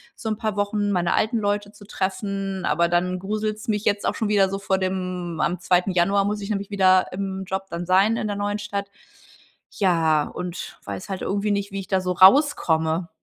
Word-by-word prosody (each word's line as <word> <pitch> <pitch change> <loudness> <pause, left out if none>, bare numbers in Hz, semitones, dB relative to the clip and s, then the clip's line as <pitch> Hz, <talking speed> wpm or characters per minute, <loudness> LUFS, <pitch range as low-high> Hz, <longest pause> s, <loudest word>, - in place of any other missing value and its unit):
so 220 - -5
'n 215 - -2
paar 215 -3 -2
Wochen 205 0 0
meine 175 -2 +1
alten 225 +1 +1
Leute 205 0 -1
zu 205 -1 -15
treffen. 195 -1 -3
Aber 170 +2 +2
dann 180 +1 +1
gruselt's 215 +2 -3
mich 210 -1 0
jetzt 205 0 +1
auch - - 0
schon 220 - -1
wieder 200 -2 +4
so 195 0 -3
vor 190 -1 0
dem 180 -3 -3
am 180 0 0
2. 180 +2 +2
Januar 195 +3 +2
muss 210 +1 -1
ich 200 - -6
nämlich 200 -1 -3
wieder 185 -2 +4
im 190 0 -4
Job 190 +1 -3
dann 170 +1 -4
sein 195 +5 +4
in 215 - -2
der 205 - -2
neuen 205 +1 -2
Stadt. 200 -1 -4 0.9
Ja 165 -6 +3
und 180 +3 -7
weiß 190 - -6
halt 190 -2 -4
irgendwie 205 +1 -1
nicht, 200 0 -1
wie 195 - -4
ich 190 - -11
da 190 -1 +1
so 180 0 -1
rauskomme. 175 - +4
195 Hz, 210 wpm, -23 LUFS, 180-205 Hz, 0.9 s, wieder